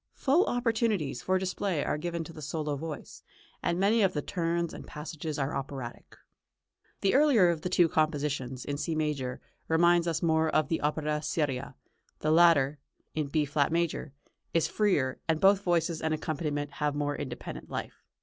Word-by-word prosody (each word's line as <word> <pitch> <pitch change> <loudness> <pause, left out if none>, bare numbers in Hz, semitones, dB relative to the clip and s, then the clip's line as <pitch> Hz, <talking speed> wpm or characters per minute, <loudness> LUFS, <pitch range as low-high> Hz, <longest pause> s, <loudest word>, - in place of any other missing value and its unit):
Full 300 +8 +3
opportunities 225 - 0
for 185 0 +1
display 185 -3 -1
are 150 - -1
given 170 +1 -3
to 165 - -10
the 155 - -10
solo 150 0 -2
voice, 155 0 -7 0.4
and 170 +1 0
many 210 +4 +3
of 195 -2 +3
the 150 - -1
turns 170 -1 -1
and - - -9
passages 155 0 -5
are 135 -1 -1
operatic. 135 -3 -6 0.9
The 195 - +2
earlier 265 -10 +5
of 165 -2 -1
the 180 - -2
two 175 -1 +4
compositions, 145 -5 -1
in 145 0 -3
C 160 +2 -2
major, 145 -5 -2 0.3
reminds 170 +1 +4
us 165 -1 -1
more 160 -1 +3
of 155 -1 +1
opera 150 0 0
seria; 140 -4 -2 0.4
the 155 - 0
later, 155 -4 +5 0.3
in 155 -2 -1
B 150 +1 +1
flat 145 +1 +1
major, 165 -3 -1 0.4
is 165 - +3
freer, 165 -12 +1
and 160 -1 +1
both 195 +2 +5
voices 170 -3 0
and 155 0 +1
accompaniment 145 -2 -3
have 150 -1 -1
more 145 0 -1
independent 130 -4 -6
life. - - -6
155 Hz, 170 wpm, -29 LUFS, 145-175 Hz, 0.9 s, earlier